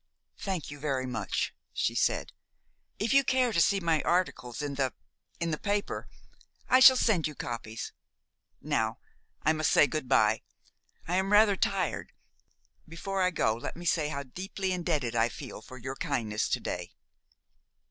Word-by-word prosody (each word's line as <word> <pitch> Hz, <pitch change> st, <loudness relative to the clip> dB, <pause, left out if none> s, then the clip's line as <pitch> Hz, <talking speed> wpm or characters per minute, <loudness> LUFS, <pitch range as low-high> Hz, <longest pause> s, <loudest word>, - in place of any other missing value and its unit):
"Thank 185 Hz, -7 st, -3 dB
you 145 Hz, -, -9 dB
very 135 Hz, -3 st, -1 dB
much," 125 Hz, -2 st, -2 dB, 0.2 s
she -, -, 0 dB
said. -, -, 0 dB, 0.7 s
"If 220 Hz, +5 st, 0 dB
you 275 Hz, 0 st, +6 dB
care 255 Hz, -2 st, +2 dB
to 170 Hz, -, +3 dB
see 200 Hz, +3 st, +3 dB
my 165 Hz, -4 st, +1 dB
articles 170 Hz, -9 st, 0 dB
in 145 Hz, -1 st, -3 dB
the 135 Hz, -2 st, 0 dB, 0.5 s
in 170 Hz, -1 st, -1 dB
the 155 Hz, -, -2 dB
paper, 205 Hz, 0 st, -2 dB, 0.6 s
I 255 Hz, -, +6 dB
shall 260 Hz, 0 st, +10 dB
send 195 Hz, -11 st, +2 dB
you 150 Hz, -, -8 dB
copies. 115 Hz, -2 st, -5 dB, 0.7 s
Now -, -, -1 dB, 0.5 s
I 155 Hz, -, +4 dB
must 155 Hz, -1 st, +1 dB
say -, -, +6 dB
good 145 Hz, -1 st, -3 dB
by. -, -, +4 dB, 0.7 s
I 180 Hz, +2 st, +1 dB
am 190 Hz, +1 st, 0 dB
rather 210 Hz, -1 st, +6 dB
tired. 190 Hz, -1 st, -1 dB, 0.8 s
Before 190 Hz, +4 st, -3 dB
I 185 Hz, -, +4 dB
go 115 Hz, -10 st, +1 dB
let 115 Hz, -, -6 dB
me 175 Hz, -, -8 dB
say 160 Hz, -3 st, +2 dB
how 140 Hz, -1 st, -3 dB
deeply 190 Hz, +7 st, -4 dB
indebted 155 Hz, -10 st, -1 dB
I 115 Hz, +1 st, +3 dB
feel 105 Hz, -, -8 dB
for 130 Hz, +4 st, -11 dB
your 130 Hz, +2 st, -5 dB
kindness 110 Hz, -5 st, -1 dB
to -, -, +1 dB
day." -, -, -5 dB
165 Hz, 165 wpm, -29 LUFS, 130-195 Hz, 0.8 s, shall